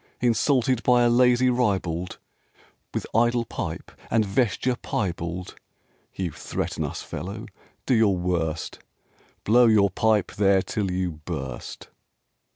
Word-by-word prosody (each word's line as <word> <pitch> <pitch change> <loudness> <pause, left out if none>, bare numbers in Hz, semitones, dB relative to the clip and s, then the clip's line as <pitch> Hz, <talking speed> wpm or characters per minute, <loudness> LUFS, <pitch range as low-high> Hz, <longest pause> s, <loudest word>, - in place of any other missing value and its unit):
Insulted 125 +1 +2
by 125 0 +4
a 120 - +4
lazy 125 +1 +4
ribald 95 -8 -1 0.7
With - - -3
idle 120 +1 +2
pipe - - -6 0.2
and 110 -2 +2
vesture 120 +4 0
piebald? 90 -5 -4 0.6
You 90 -3 -3
threaten - - -4
us, - - -5
fellow? 100 +8 -6 0.4
Do 130 - +2
your 110 -5 +3
worst, 85 -3 -2 0.6
Blow 120 +3 +5
your 100 -3 +4
pipe 110 -3 +1
there 100 -2 +3
till 100 -3 -2
you 90 -3 -2
burst!" 65 -3 -6
105 Hz, 120 wpm, -25 LUFS, 90-120 Hz, 0.7 s, Blow